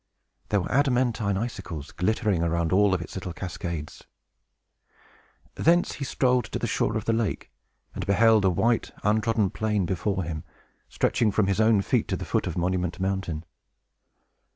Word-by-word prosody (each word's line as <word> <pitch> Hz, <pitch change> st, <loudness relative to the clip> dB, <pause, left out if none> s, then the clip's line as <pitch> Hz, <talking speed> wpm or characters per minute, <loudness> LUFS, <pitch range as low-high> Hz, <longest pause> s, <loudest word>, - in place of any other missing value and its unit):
There 100 Hz, -, +2 dB
were 90 Hz, -, -5 dB
adamantine 125 Hz, -7 st, +1 dB
icicles 90 Hz, -, -5 dB
glittering 105 Hz, -1 st, 0 dB
around 85 Hz, 0 st, 0 dB
all 100 Hz, 0 st, +4 dB
its 85 Hz, -2 st, -6 dB
little 90 Hz, -2 st, -5 dB
cascades. 85 Hz, -4 st, -6 dB, 1.5 s
Thence 175 Hz, +2 st, +3 dB
he 140 Hz, -, -6 dB
strolled 125 Hz, -3 st, +1 dB
to -, -, -4 dB
the -, -, -2 dB
shore -, -, 0 dB
of -, -, -5 dB
the 115 Hz, -, +2 dB
lake, 115 Hz, -3 st, -2 dB, 0.4 s
and -, -, -4 dB
beheld 110 Hz, +1 st, +5 dB
a 95 Hz, -, +4 dB
white, 115 Hz, +6 st, +1 dB
untrodden 110 Hz, -1 st, +2 dB
plain 105 Hz, -3 st, 0 dB
before 95 Hz, +2 st, -1 dB
him, 80 Hz, -2 st, -5 dB, 0.5 s
stretching 120 Hz, -4 st, +1 dB
from 105 Hz, 0 st, +2 dB
his 100 Hz, +2 st, +1 dB
own 110 Hz, -2 st, +4 dB
feet -, -, +1 dB
to -, -, -1 dB
the -, -, -6 dB
foot -, -, 0 dB
of 90 Hz, -, -4 dB
Monument 90 Hz, 0 st, -1 dB
Mountain. 95 Hz, -4 st, -2 dB
100 Hz, 155 wpm, -26 LUFS, 90-115 Hz, 1.5 s, beheld